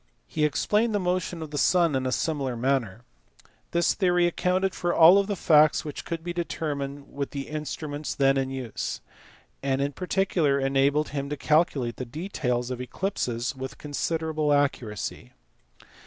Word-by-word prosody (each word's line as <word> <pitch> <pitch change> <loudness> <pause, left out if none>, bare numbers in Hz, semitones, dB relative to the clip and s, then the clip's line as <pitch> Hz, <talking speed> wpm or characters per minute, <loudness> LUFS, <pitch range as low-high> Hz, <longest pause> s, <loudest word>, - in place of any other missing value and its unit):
He 155 -1 0
explained 210 +8 +1
the - - +2
motion 180 -2 -1
of 155 - -9
the 145 - -2
sun 170 -2 +3
in 130 0 0
a - - -1
similar 135 -2 -1
manner. 120 -4 -1 0.7
This 170 0 +2
theory 180 -3 +2
accounted 180 +2 +1
for 175 0 -1
all 175 +5 +8
the 200 0 -3
facts 155 -4 +4
which 150 - -6
could 165 -1 -4
be 175 0 -4
determined 145 -5 -4
with 140 -1 -3
the 140 -2 -5
instruments 150 0 -4
then 135 -1 +3
in 135 -1 0
use, 130 -4 -4 0.6
and 135 -1 0
in 140 +1 0
particular 180 -4 +1
enabled 140 +2 +2
him 140 -1 -4
to 150 - -3
calculate 140 -6 +1
the 130 - -4
details 125 -4 -2
of 125 0 -4
eclipses 125 - -2
with 130 0 -7
considerable 155 +1 -1
accuracy. 120 - -1
145 Hz, 155 wpm, -26 LUFS, 135-170 Hz, 0.7 s, all